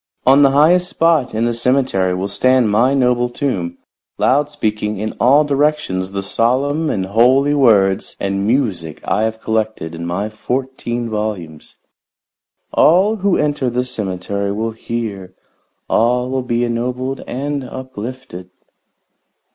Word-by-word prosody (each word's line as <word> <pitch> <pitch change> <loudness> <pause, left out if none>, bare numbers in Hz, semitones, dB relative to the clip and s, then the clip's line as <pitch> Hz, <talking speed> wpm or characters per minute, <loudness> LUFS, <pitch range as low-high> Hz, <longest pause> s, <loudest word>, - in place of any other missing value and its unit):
On 135 +2 +6
the 140 - +6
highest 170 +6 +4
spot 160 -8 +1
in 115 +2 +1
the 120 - 0
cemetery 115 -7 +1
will 95 +2 -2
stand 130 +2 +2
my 125 +6 +3
noble 125 -2 +2
tomb, 95 -11 -3 0.4
loud 145 +3 +2
speaking 105 -6 -2
in 110 +2 -3
all 140 +5 +5
directions 145 -10 0
the 100 0 -4
solemn 140 +9 0
and 95 -7 -1
holy 125 +8 +3
words 105 -9 +3
and 100 0 -1
music 100 - -1
I 110 - +1
have 110 0 -3
collected 110 -8 -2
in 85 +1 -6
my 95 +5 -2
fourteen 120 0 -3
volumes. 105 -8 -5 1.0
All 195 +7 +4
who 200 -2 +1
enter 145 -3 0
the 125 +1 -1
cemetery 100 -3 -3
will 110 +3 -2
hear; 110 -5 -5 0.5
all 125 +2 +1
will 130 0 -1
be 120 -1 -1
ennobled 125 +3 -2
and 140 +2 -3
uplifted." 130 -7 -8
120 Hz, 135 wpm, -17 LUFS, 100-135 Hz, 1.0 s, On